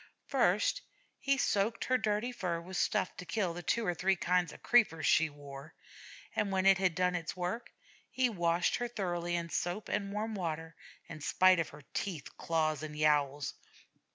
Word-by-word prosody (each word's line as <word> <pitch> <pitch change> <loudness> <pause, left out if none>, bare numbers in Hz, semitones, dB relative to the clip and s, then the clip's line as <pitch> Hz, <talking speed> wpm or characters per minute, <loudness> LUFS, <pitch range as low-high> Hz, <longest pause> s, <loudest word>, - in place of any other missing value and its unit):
First, - - +2 0.4
he 275 0 +1
soaked 220 -1 +1
her 255 - +2
dirty 215 +3 0
fur 180 -8 -2
with 180 +3 -9
stuff 185 +1 0
to - - -6
kill 190 -5 0
the 175 - -6
two 230 +5 0
or 175 - +1
three 190 +3 +2
kinds 180 -2 +1
of - - -14
creepers 195 -11 +3
she 160 0 +4
wore; 145 +1 -11 0.6
and, 205 -2 0
when 190 0 +1
it 195 -1 +6
had 185 -4 +2
done 180 +1 +2
its 170 -2 -3
work, 180 +7 -3 0.4
he 260 -1 +2
washed 175 -5 +1
her 240 - -2
thoroughly 175 -6 -2
in 170 -1 -2
soap 175 +6 -2
and 200 -1 -1
warm 215 +2 -2
water, 160 -4 -4 0.3
in 155 -2 -9
spite 185 +4 +4
of 165 - -1
her 150 - -13
teeth, 170 -8 -4
claws, 155 -3 0
and 150 -1 -6
yowls. 145 -2 +2
180 Hz, 180 wpm, -32 LUFS, 160-205 Hz, 0.6 s, it